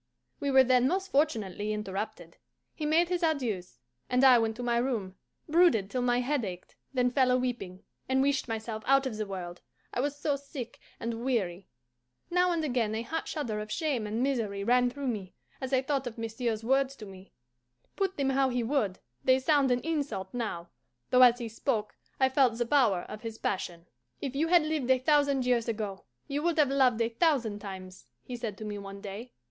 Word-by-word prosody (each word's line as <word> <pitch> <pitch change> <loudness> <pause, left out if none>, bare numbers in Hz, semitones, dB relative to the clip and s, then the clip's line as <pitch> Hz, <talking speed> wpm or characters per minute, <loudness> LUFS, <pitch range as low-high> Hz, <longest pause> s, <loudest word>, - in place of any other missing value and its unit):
We 285 - -1
were 265 -1 +7
then 255 0 +4
most 380 +5 -1
fortunately 215 - 0
interrupted. 200 -4 -5 0.4
He 305 - -3
made 335 +3 +3
his 360 0 0
adieus, 245 - -1 0.3
and 250 +1 +2
I 255 -3 +8
went 225 -1 0
to 245 - -6
my 240 -1 +1
room, 235 -7 -1 0.3
brooded 310 - +4
till 255 - -1
my 245 0 +2
head 270 0 0
ached, 180 -3 -7 0.2
then 250 -2 +1
fell 260 -1 +3
a 250 - +4
weeping, 235 -8 -4 0.3
and 265 0 +3
wished 280 -1 +1
myself 220 -1 -4
out 275 0 +4
of 255 -4 -3
the 215 -1 -3
world, 180 -2 -6 0.3
I - - -2
was 285 +2 0
so 290 -1 0
sick 275 -4 -8 0.2
and 230 0 -4
weary. 195 -8 -1 0.6
Now 360 0 +3
and 335 -2 0
again 240 -6 0
a 225 - -2
hot 320 +7 -4
shudder 235 -9 -3
of 210 0 -6
shame 275 -9 -1
and 220 +4 -1
misery 220 -7 -1
ran 245 +3 +3
through 280 +3 -6
me, 205 -6 -4 0.3
as 260 0 -4
I 260 -1 +2
thought 275 -2 -1
of 235 - -7
monsieur's 225 0 -2
words 270 +2 +2
to 215 - -10
me. 190 -1 -13 0.6
Put 385 -1 -1
them 275 -1 +1
how 270 0 +2
he 245 -1 -1
would, 225 -7 0 0.3
they 260 0 +5
sound 275 0 +3
an 245 0 +2
insult 285 - -3
now, 210 -8 -4 0.4
though 255 - +6
as 245 -1 +8
he 240 -2 -4
spoke 225 -1 -2 0.3
I 265 - +5
felt 260 -3 +3
the 240 - 0
power 230 -9 +3
of 215 +3 -9
his 225 -1 -6
passion. 175 -5 -3 0.3
"If 275 -2 -4
you 310 +4 +1
had 345 -1 +5
lived 305 -5 -2
a 260 - +6
thousand 280 -1 +2
years 245 -2 +2
ago, 210 -4 -4 0.2
you 285 +1 -2
would 335 0 0
have 290 -3 +4
loved 255 -4 +3
a 230 - +2
thousand 235 -5 +1
times," 190 - -9 0.2
he 250 - -6
said 225 -4 -5
to 215 - -7
me 205 -1 -4
one 200 0 -8
day. 205 +5 -8
245 Hz, 205 wpm, -29 LUFS, 215-275 Hz, 0.6 s, I